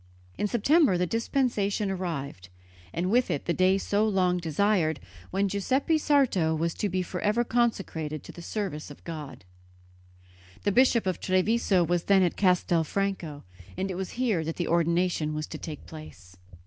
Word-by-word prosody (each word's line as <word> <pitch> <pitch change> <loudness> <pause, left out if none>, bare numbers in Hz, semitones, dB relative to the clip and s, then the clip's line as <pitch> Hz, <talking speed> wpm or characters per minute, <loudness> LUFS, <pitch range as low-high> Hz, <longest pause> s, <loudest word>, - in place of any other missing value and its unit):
In 210 - -1
September 240 - +3
the 180 - +1
dispensation 220 - 0
arrived, 140 - -5 0.4
and 180 - -1
with 245 +2 +3
it 145 - -2
the 170 - +1
day 185 +2 +3
so 205 +1 0
long 185 -3 +2
desired, 165 -2 +1 0.3
when 195 +2 0
Giuseppe 260 - +1
Sarto 250 - +2
was 165 +1 -1
to 205 - -2
be 185 0 -1
for 180 +1 -5
ever 215 +3 +2
consecrated 195 - -1
to - - -10
the 175 - -11
service 170 -6 -4
of 145 - -13
God. 150 - -8 1.2
The 205 - +2
Bishop 240 0 +4
of 185 -1 -1
Treviso 185 0 +2
was 175 0 0
then 195 -1 +5
at 175 - 0
Castelfranco, 180 -3 0 0.3
and 190 +1 -2
it - - -4
was 190 0 -4
here 225 -10 +1
that 165 +1 -4
the 175 - -2
ordination 170 -2 +1
was 155 0 -3
to - - -8
take 155 -3 -7
place. 100 - -12
185 Hz, 165 wpm, -27 LUFS, 165-205 Hz, 1.2 s, then